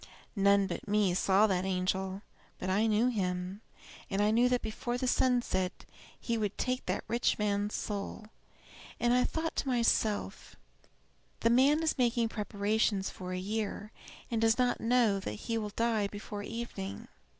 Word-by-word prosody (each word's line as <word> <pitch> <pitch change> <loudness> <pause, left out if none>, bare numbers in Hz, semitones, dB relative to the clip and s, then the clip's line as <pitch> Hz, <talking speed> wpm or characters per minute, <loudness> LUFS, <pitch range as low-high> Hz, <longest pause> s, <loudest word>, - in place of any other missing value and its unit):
None 200 0 +4
but 190 - -5
me 205 -3 +2
saw 195 +3 +4
that 185 -3 +1
angel; 190 +1 -1 0.3
but 185 - -3
I 210 +4 +2
knew 220 +2 +3
him, 185 -2 -2 0.5
and 205 +2 +2
knew 240 +2 +4
that 250 -1 +1
before 240 +2 -3
the 255 - -2
sun 250 -1 +2
set 185 -4 -2 0.3
he 230 -2 -2
would 210 -2 -2
take 255 0 -2
that - - -1
rich 235 +1 +1
man's 205 0 0
soul. 205 +1 -4 0.7
And 240 0 +3
I 250 0 +4
thought 320 +3 -2
to - - -1
myself, 230 - 0 0.9
'The 230 - +3
man 280 +6 +4
is 315 -3 0
making 235 -2 +2
preparations 205 -1 0
for 185 -1 -7
a 185 - -2
year, 210 +2 -3 0.4
and 225 -1 0
does 225 0 +4
not 250 -1 +1
know 230 -4 +3
that 145 - -5
he 230 -1 0
will 210 -1 -3
die 220 -1 0
before 205 0 -7
evening.' 205 - -6
215 Hz, 160 wpm, -31 LUFS, 195-235 Hz, 0.9 s, None